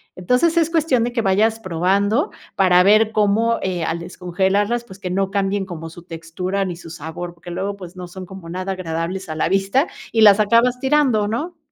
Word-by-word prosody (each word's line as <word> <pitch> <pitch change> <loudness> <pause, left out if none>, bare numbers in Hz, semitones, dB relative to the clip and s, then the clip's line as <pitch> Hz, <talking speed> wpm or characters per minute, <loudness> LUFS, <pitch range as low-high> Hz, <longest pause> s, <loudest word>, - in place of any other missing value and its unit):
Entonces 250 - +1
es 330 -1 +3
cuestión 305 -8 +2
de 240 - -1
que 235 - 0
vayas 220 +3 +2
probando 195 +3 +1 0.2
para 180 -2 +5
ver 215 +3 +4
cómo, 220 +2 +2
eh, 180 -3 -2
al 165 +1 -2
descongelarlas 190 +6 -1
pues 190 -5 -13
que 180 -2 -4
no 195 +1 0
cambien 200 -1 0
como 165 -3 -7
su 175 - -12
textura 175 +3 -4
ni 180 -2 -4
su 170 - -11
sabor, 170 +2 -7
porque 175 +1 -10
luego 195 +3 -3
pues 180 -2 -10
no 180 -1 -7
son 185 +1 -9
como 185 -2 -11
nada 185 +2 -4
agradables 180 +1 -4
a 155 - -4
la 155 - 0
vista 195 - +2 0.2
y 225 - +2
las 205 -1 +7
acabas 235 +4 +3
tirando, 265 -6 +2
¿no? 310 +11 -4
195 Hz, 200 wpm, -20 LUFS, 180-225 Hz, 0.2 s, las